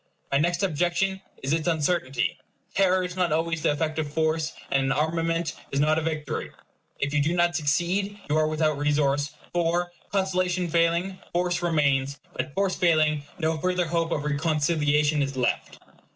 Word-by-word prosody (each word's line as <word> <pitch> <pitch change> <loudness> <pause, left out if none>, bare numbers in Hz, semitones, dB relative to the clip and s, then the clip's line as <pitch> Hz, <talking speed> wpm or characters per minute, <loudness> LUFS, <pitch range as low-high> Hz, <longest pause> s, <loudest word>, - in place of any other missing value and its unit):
My 140 - +3
next 170 +4 +1
objection 180 +3 0 0.2
is 135 +3 0
its 165 +1 0
uncertainty. 150 -6 0 0.4
Terror 185 -1 +3
is 180 0 -5
not 180 -3 +1
always 165 +1 0
the 165 - +2
effect 155 +1 -1
of 150 -2 -2
force, 160 0 0 0.2
and 135 -1 +2
an - - +1
armament 165 +2 0 0.2
is 140 - -1
not 155 +2 +3
a - - -3
victory. 155 -1 -3 0.5
If 140 +1 -1
you 150 - +3
do 160 +4 +1
not 175 0 +2
succeed, 175 +6 0
you 150 - +1
are 155 0 +3
without 155 -1 0
resource; 145 -1 +1 0.2
for, 175 +1 +1 0.2
conciliation 185 -2 0
failing, 170 +3 +1
force 175 0 0
remains; 145 -5 +1 0.2
but, - - -3
force 195 -1 +1
failing, 155 -4 +2
no 160 0 0
further 180 +1 +1
hope 165 0 -1
of 145 - -1
reconciliation 150 0 +2
is 135 -1 -2
left. 125 -2 -1
160 Hz, 165 wpm, -26 LUFS, 150-175 Hz, 0.5 s, My